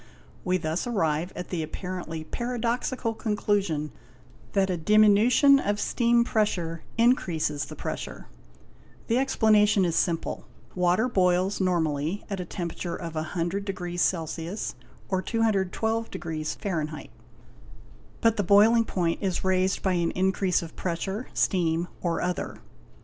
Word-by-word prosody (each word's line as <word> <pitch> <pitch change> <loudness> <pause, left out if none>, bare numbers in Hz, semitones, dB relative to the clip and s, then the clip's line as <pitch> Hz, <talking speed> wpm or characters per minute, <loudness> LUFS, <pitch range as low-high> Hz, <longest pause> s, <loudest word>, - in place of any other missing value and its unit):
We 185 0 +1
thus 165 +5 -2
arrive 170 -6 0
at 180 - -6
the 175 -3 -2
apparently 165 0 -5
paradoxical 240 +3 -2
conclusion 200 -8 -1 0.6
that 195 -1 +2
a - - 0
diminution 215 - +5
of 205 -4 -1
steam 235 +1 +2
pressure 175 -8 -1 0.2
increases 170 - +1
the - - -9
pressure. - - -6 0.8
The 235 +2 +3
explanation 210 -6 +4
is 170 -2 0
simple; 170 -2 -1 0.3
water 180 +6 +2
boils 185 -3 +2
normally 165 -1 0
at 195 - -2
a 180 - -3
temper 170 -1 -4
ature 175 -2 -4
of 165 -2 -6
100°C 175 +1 -2 0.3
or 190 -1 0
212°F, 190 -7 -2 1.1
but 230 -1 +3
the 205 - +1
boiling 215 +5 +5
point 170 -5 -1
is 190 -3 -1
raised 190 0 +1
by 190 - +2
an 170 -1 +1
increase 190 -1 +1
of 165 - -10
pressure, 190 +6 -3
steam 170 -2 +1
or 170 -2 -1
other. 180 0 -3
185 Hz, 120 wpm, -26 LUFS, 170-215 Hz, 1.1 s, diminution